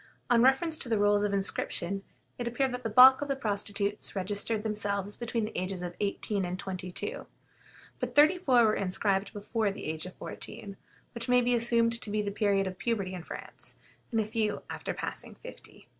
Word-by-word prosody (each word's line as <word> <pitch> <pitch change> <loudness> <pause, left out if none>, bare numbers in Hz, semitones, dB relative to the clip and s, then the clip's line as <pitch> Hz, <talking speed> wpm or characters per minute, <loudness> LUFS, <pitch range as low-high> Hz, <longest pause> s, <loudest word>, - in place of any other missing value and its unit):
On 235 -1 +6
reference 270 +6 +3
to 255 - -3
the 225 - +2
rolls 205 0 +3
of 205 - +1
inscription, 195 -1 -1 0.4
it 240 - -2
appeared 255 +3 0
that 250 0 -4
the 225 - -3
bulk 255 +5 +8
of 290 - -2
the 275 - 0
prostitutes 205 -3 -1
registered 205 +3 0
themselves 205 -2 -2
between 235 -2 -2
the 215 - -8
ages 185 0 -2
of 175 0 -4
eighteen 200 0 -1
and 180 0 -3
twenty 185 -1 -5
two; 460 - -4 0.7
but - - -4
thirty 305 +5 +6
four 250 -9 +4
were 215 - +3
inscribed 195 +1 0
before 210 +1 -1
the 195 - -6
age 160 +3 -3
of 185 - -11
fourteen, 200 -2 -6 0.4
which 235 +1 -2
may 250 0 +5
be 245 0 +2
assumed 230 -1 +2
to - - -6
be 210 0 0
the 200 - -2
period 200 -1 +1
of 185 0 -5
puberty 195 -2 -1
in 180 - -5
France, - - -8 0.4
and 225 - +1
a 215 - +1
few 215 -1 -1
after - - -4
passing - - -5
fifty. - - -13
210 Hz, 200 wpm, -29 LUFS, 195-235 Hz, 0.7 s, bulk